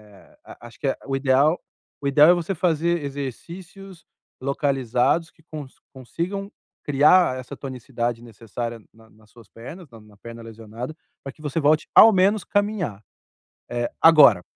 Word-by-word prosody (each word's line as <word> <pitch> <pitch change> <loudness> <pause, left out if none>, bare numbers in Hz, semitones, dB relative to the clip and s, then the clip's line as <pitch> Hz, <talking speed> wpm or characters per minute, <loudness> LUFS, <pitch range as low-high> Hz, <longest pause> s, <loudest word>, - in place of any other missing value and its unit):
eh, - - -21
a - - -14
acho 115 - -18
que 135 -2 -1
o 135 - -2
ideal 140 +4 +2 0.4
o 140 - -2
ideal 150 +4 +6
é - - +8
você 175 +2 -3
fazer 170 -1 0
exercícios 170 - -8 0.4
localizados 140 +3 0
que 160 - -27
com 155 -3 -8
que - - -25 0.2
consigam 180 +10 -5 0.3
criar 145 0 +4
essa 130 +2 -9
tonicidade 120 -3 -5
necessária 115 +1 -7
na 110 0 -21
nas 105 0 -24
suas 115 -2 -18
pernas, 155 +8 -11
na 115 -2 -14
na 105 -1 -20
perna 115 +1 -11
lesionada, 115 +4 -8 0.3
para 135 - -7
que 155 - -20
você 150 +2 -3
volte 155 +2 +2
ao 225 - +9
menos 195 +2 +2
caminhar. 205 - -2 0.7
Eh, 120 0 -2
agora, 140 - +7
140 Hz, 155 wpm, -23 LUFS, 120-170 Hz, 0.7 s, ao